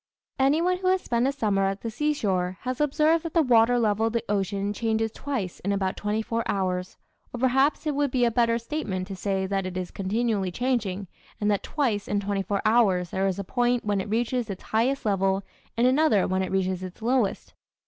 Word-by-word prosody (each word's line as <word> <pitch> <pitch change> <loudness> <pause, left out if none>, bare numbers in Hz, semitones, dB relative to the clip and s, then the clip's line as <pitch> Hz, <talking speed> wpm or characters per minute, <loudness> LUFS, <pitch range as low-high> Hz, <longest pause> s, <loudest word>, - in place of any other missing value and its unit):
Anyone 325 +7 +3
who 370 - -2
has 375 0 +3
spent 240 +2 +1
a - - +2
summer 205 -8 +1
at 195 +1 -2
the 230 - -4
seashore 205 -10 -1
has 255 +2 -3
observed 305 +3 +2
that 330 0 -6
the 330 - +5
water 245 -1 +4
level 220 -1 +2
of 225 - -3
the 230 -1 0
ocean 200 0 -1
changes 225 +1 0
twice 230 -9 -4
in 200 - -2
about 195 -1 0
twenty 210 +1 -1
four 230 +1 -1
hours, 185 -2 -2 0.3
or 245 - -6
perhaps 265 +5 +2
it 300 - 0
would 285 0 +1
be 250 -1 +2
a 235 - +2
better 230 0 +2
statement 230 -7 -3
to 195 - -4
say 190 0 -1
that 195 -1 -1
it 185 0 -5
is 180 -1 -4
continually 205 0 -1
changing 205 -5 -1 0.3
and 210 0 +1
that 200 - +1
twice 235 -9 -1
in 205 - 0
twenty 200 0 -1
four 200 0 -2
hours 200 -6 +3
there 190 +1 0
is 190 - -1
a 200 - -3
point 245 +3 0
when 205 -2 +1
it 195 - -7
reaches 235 +1 -1
its 195 -2 -6
highest 250 +4 0
level 195 -1 +1 0.3
and 235 - +3
another 255 -6 +3
when 185 0 0
it 190 - -3
reaches 185 -1 0
its 185 +4 -8
lowest. 240 -3 0
220 Hz, 215 wpm, -26 LUFS, 195-250 Hz, 0.3 s, the